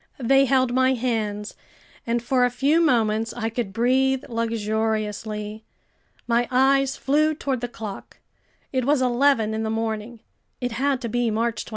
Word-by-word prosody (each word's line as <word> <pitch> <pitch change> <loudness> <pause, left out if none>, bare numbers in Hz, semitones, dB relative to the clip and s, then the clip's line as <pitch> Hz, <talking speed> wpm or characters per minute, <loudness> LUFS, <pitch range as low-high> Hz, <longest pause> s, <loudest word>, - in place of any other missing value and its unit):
They 270 +3 +5
held 260 -2 +2
my 260 +1 +3
hands, 220 -4 -2 0.5
and 235 0 0
for 250 +1 +2
a 245 - +4
few 280 +7 +2
moments 225 -6 +1
I 225 -2 -2
could 225 -3 -3
breathe 260 +4 +2
luxuriously. 220 -1 -2 0.6
My 235 0 +1
eyes 270 +1 +3
flew 305 +3 +2
toward 270 -5 -2
the 245 - -2
clock. 215 -4 -8 0.6
It 260 -1 +1
was 285 +2 +2
eleven 245 -3 +2
in 220 - -2
the 220 - -2
morning. 225 +1 -3 0.4
It 245 -1 -2
had 265 +3 0
to 235 - -3
be 240 +1 0
March 230 +1 -1
28. - - -11
240 Hz, 160 wpm, -23 LUFS, 220-260 Hz, 0.6 s, They